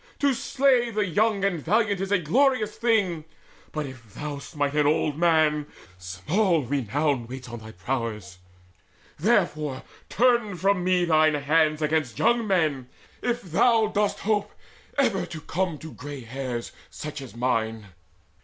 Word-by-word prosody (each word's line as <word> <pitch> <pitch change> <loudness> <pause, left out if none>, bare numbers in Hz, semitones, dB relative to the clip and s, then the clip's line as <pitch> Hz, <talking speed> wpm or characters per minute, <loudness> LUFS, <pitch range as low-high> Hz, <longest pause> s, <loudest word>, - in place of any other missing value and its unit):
To 280 -1 +2
slay 255 -1 +2
The 215 -2 0
young 200 +3 +1
and 180 -4 0
valiant 205 +1 +1
is 195 0 -3
a 205 - +5
glorious 215 - +2
thing; 205 -9 +1 0.5
But 155 -1 -3
if 120 -6 -12
thou 145 -1 -5
smite 145 -1 -3
an 150 -1 +3
old 150 -1 +1
man, 155 -3 +2 0.3
small 155 - 0
renown 135 0 -1
Waits 130 0 -8
on 120 0 -7
thy 110 0 -11
prowess. 105 -3 -4 0.8
Therefore 155 - +1 0.3
turn 235 -4 +2
from 190 0 +1
me 180 -1 +2
Thine 155 -2 +4
hands 155 +1 +2
against 150 -7 0
young 235 -2 +2
men, 155 -9 +1 0.3
if 240 0 -1
thou 215 +5 +3
dost 205 -1 0
hope 210 -1 0 0.5
Ever 255 -9 +1
to 160 - -7
come 175 +1 -2
to 160 +2 -10
grey 145 0 -8
hairs 125 0 -5 0.2
such 150 -1 -7
as 130 -4 -10
mine." 115 -3 -1
155 Hz, 145 wpm, -25 LUFS, 135-205 Hz, 0.8 s, a